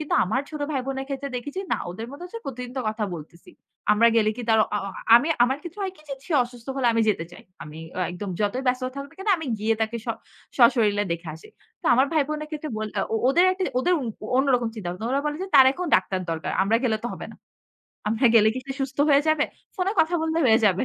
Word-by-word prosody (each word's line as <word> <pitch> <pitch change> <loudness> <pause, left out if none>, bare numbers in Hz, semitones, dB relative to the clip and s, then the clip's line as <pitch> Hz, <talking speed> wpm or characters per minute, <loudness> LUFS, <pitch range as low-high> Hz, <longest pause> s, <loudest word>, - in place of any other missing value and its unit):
কিন্তু 305 - -2
আমার 220 +8 0
ছোট 305 -1 -6
ভাই 270 - 0
বোনের 270 0 -3
ক্ষেত্রে 280 0 -4
দেখেছি 290 +9 -5
না - - +3
ওদের 220 +6 -6
মধ্যে 285 +6 -9
হচ্ছে 460 +6 -8
প্রতিদিন 250 -2 -6
তো - - 0
কথা 215 0 -2
বলতেছি। 170 +2 -11 0.4
আমরা 230 +2 +4
গেলে 215 -1 +4
কি 245 - -5
তার 220 -1 +5
অ - - -12
আ - - 0 0.4
আমি 280 +7 +2 0.2
আমার 265 +3 -1
ক্ষেত্রে 350 +4 -8
হয় 380 -1 -2
কি 305 - -19
যে, 275 - -3
সে - - -4
অসুস্থ 240 -1 -13
হলে 265 -2 +1
আমি 230 - +2
যেতে 200 -6 +1
চাই। - - -12 0.2
আমি 155 +1 -10 0.3
একদম 185 +3 -6
যতই 210 +5 0
ব্যস্ত 250 +1 +1
থাকুক 280 0 -6
না - - -22
কেন 385 +2 -5
আমি 320 - -6
গিয়ে 220 +2 +1
তাকে 220 +1 -1
স - - -5 0.5
সশরীরে 220 -4 +4
দেখে 170 0 -6
আসি। 160 - -14 0.3
তো - - -4
আমার 260 +3 +4
ভাই 310 -2 +3
বোনের 305 0 -4
ক্ষেত্রে 305 0 -5
বোলঅ 215 -1 -4 0.2
ও - - +1
ওদের, 340 +7 +4 0.3
ওদের 355 +8 +2 0.4
অন্যরকম 255 -3 +2
চিন্তা। 210 -6 -5 0.2
ওরা 275 +2 +1
বলে 295 0 -1
যে, - - -3
তার 265 - +9
এখন 360 +5 -4
ডাক্তার 185 0 -2
দরকার। 160 -1 -3
আমরা 210 +4 +3
গেলে 225 -3 +2
তো - - +1
হবে - - -7
না। - - -15 0.7
আমরা 225 +4 +2
গেলে 220 -1 +6
কি - - -3
সে 270 - -3
সুস্থ 270 0 -4
হয়ে 280 0 +5
যাবে? 310 -1 +3 0.3
ফোনে 375 +1 0
কথা 325 +2 +1
বললে 320 0 0
হয়ে 220 -2 +6
যাবে। 190 +2 +2
255 Hz, 235 wpm, -24 LUFS, 215-295 Hz, 0.7 s, তার